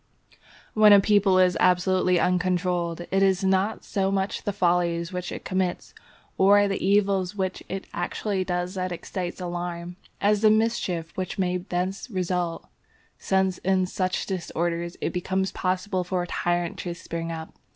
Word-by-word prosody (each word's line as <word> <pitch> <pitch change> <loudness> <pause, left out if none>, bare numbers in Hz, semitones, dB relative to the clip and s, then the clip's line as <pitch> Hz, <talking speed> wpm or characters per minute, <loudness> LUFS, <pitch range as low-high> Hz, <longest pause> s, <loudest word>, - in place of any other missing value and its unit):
When 215 -1 +7
a 200 - +9
people 195 -2 +3
is 185 -1 +4
absolutely 180 0 +3
uncontrolled, 180 -1 0
it 195 +1 +2
is 195 0 +3
not 190 +3 +1
so 195 -2 -1
much 195 0 -2
the 205 - 0
follies 175 -2 +1
which 180 -1 -4
it - - -7
commits 185 -2 -2 0.5
or 205 +1 +6
the 195 - -2
evil 195 0 +3
which 190 -2 -2
it 190 +1 -4
actually 190 +2 -2
does 180 0 -2
that 185 -1 -3
excites 175 +1 -5
alarm, 175 0 -5 0.2
as 205 0 +2
the 215 - +6
mischief 215 -7 0
which 185 +2 -4
may 180 -1 0
thence 180 +4 -3
result, 180 -4 -2 0.5
since 190 -1 +1
in 190 0 +1
such 185 0 -2
disorders 170 -2 -3
it - - -2
becomes 190 +1 -1
possible 185 0 -1
for 180 0 -1
a - - -6
tyrant 175 0 -1
to 175 -1 -4
spring 165 0 -5
up. 160 -1 -7
185 Hz, 155 wpm, -25 LUFS, 175-195 Hz, 0.5 s, a